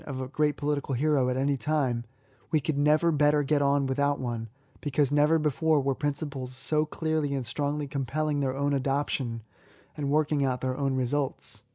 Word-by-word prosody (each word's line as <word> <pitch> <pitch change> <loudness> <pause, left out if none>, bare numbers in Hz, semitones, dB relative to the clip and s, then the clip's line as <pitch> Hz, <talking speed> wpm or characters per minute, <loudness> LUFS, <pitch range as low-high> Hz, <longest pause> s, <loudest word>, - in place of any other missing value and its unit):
73 140 - -5
of 130 0 -3
a 130 - -13
great 150 -1 +1
poKtical 145 -2 -1
hero 140 -2 +2
at 125 - -1
any 140 +1 +1
time, 135 -5 0 0.5
we 155 - +2
could 150 +1 -2
never 150 +4 +3
better 150 -1 +3
get 145 +1 +1
on 140 0 +2
without 140 +2 0
one, 115 -3 -4 0.3
because 145 -1 0
never 150 +2 +4
before 155 0 +2
were 135 0 +1
principles 140 -3 -4
so 150 +3 +1
clearly 155 -3 -1
and 130 -2 -3
strongly 145 +4 -2
compelling 145 +2 -1
their 135 -1 -1
own 140 0 +1
adoption, 135 -4 -1 0.5
and 145 -2 -2
working 150 -1 +2
out 130 -2 0
their 130 -1 -1
own 135 -1 0
residts. 130 +2 -2
140 Hz, 185 wpm, -28 LUFS, 130-150 Hz, 0.5 s, never